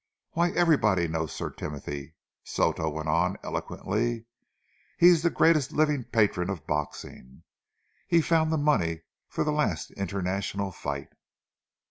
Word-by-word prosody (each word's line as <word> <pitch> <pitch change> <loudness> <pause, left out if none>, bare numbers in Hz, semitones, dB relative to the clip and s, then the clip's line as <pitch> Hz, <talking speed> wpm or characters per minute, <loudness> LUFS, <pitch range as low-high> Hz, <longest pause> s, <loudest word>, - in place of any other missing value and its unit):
"Why, 170 +1 +2
everybody 110 - +3
knows 80 -1 -2
Sir - - -4
Timothy," 75 +1 -6 0.3
Soto 80 - 0
went 80 +1 -5
on 85 +5 +1
eloquently. 115 +2 -2 0.7
"He 175 - +8
is 170 -3 +5
the 170 - +3
greatest 155 -5 +3
living 150 -5 +2
patron 100 -5 +1
of 95 -5 -4
boxing. 70 -3 -5 0.6
He 170 - +4
found 160 -1 +2
the 160 - +2
money 85 - +1 0.2
for - - -1
the 150 - 0
last 110 - -1
international 100 +1 -2
fight." 70 -5 -5
100 Hz, 130 wpm, -27 LUFS, -, 0.7 s, He